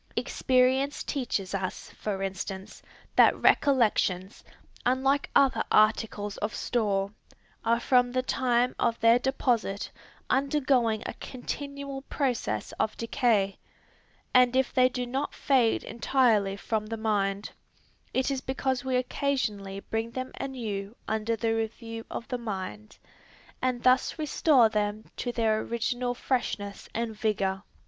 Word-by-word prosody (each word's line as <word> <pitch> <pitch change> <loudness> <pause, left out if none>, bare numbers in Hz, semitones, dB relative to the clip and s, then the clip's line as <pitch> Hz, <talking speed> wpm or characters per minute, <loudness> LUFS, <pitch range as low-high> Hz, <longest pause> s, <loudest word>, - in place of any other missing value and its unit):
Experience 260 +2 +2
teaches 225 -9 -2
us, 190 -2 -4
for 195 -2 -4
instance, 190 0 -5 0.3
that - - +6
recollections, 210 -8 +2 0.4
unlike 270 +3 +2
other 275 -2 +4
articles 215 -1 +2
of 210 +1 -3
store, 200 -4 0 0.5
are 230 +1 +2
from 245 0 +3
the 255 0 0
time 250 -1 +1
of 230 0 +1
their 230 +2 +5
deposit 245 -6 0 0.4
undergoing 260 -5 +2
a - - -4
continual 280 +1 -5
process 250 - -2
of 215 - 0
decay, 225 -5 +1 0.7
and 250 0 +5
if 260 -1 +2
they 255 0 +5
do 250 -1 -3
not 265 +4 -3
fade 255 -5 +2
entirely 225 -5 +2
from 215 +1 -2
the 225 +1 -4
mind, 205 -2 -1 0.6
it 260 +2 0
is 270 -1 -2
because 260 -1 -1
we 260 -1 -1
occasionally 220 -7 -1
bring 225 +2 -3
them 255 +2 -5
anew 220 -6 -4
under 220 +1 0
the 225 +1 0
review 225 0 -4
of 230 - -6
the 250 - -2
mind, 185 - -6 0.6
and 255 -2 -1
thus 255 +4 +3
restore 300 -5 +4
them 210 0 -2
to 245 - -3
their 220 -2 +1
original 245 +2 -2
freshness 205 -6 -2
and 230 -1 -2
vigor. 195 -3 0
235 Hz, 125 wpm, -28 LUFS, 210-255 Hz, 0.7 s, that